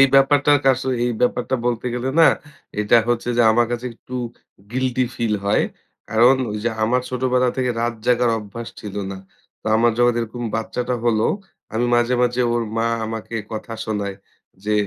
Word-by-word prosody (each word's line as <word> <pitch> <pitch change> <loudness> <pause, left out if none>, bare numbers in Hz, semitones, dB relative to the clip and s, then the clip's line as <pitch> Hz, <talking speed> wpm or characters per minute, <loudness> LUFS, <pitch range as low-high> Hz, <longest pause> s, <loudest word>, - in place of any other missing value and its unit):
এই 135 - +9
ব্যাপারটা 135 +1 +5
কা 135 - +5
আসলে 130 0 -1
এই 120 - 0
ব্যাপারটা 125 +1 +1
বলতে 120 0 -1
গেলে 125 +2 -2
না 165 - +8 0.5
এটা 105 +3 +4
হচ্ছে 120 0 0
যে 120 - +5
আমার 120 +1 +3
কাছে 120 +1 -3
একটু 125 +2 -9 0.6
গিল্টি 130 0 +1
ফিল 115 -2 0
হয়। 100 - +3 0.5
কারণ 120 +4 +5 0.2
ঐযে 105 +3 -1 0.2
আমার 125 +3 +2
ছোটবেলা 125 0 +1
থেকে 125 -1 +1
রাত 120 0 0
জাগার 125 -1 +3
অভ্যাস 110 +2 -7
ছিল 105 -2 -7 0.2
না। 95 - -7 0.4
তো - - -13
আমার 120 +1 +4
যখন 120 0 +5
এরকম 115 +2 -5
বাচ্চাটা 125 +2 -2
হলো 110 -2 +3 0.5
আমি 120 +2 +1
মাঝে, 120 +1 +2
মাঝে 125 0 +1
ওর 120 - +1
মা 115 0 +1 0.2
আমাকে 115 +1 -6 0.2
কথা 110 +1 -5
শোনায়। 100 -2 -3 0.5
যে 105 - 0
120 Hz, 175 wpm, -21 LUFS, 115-125 Hz, 0.6 s, এই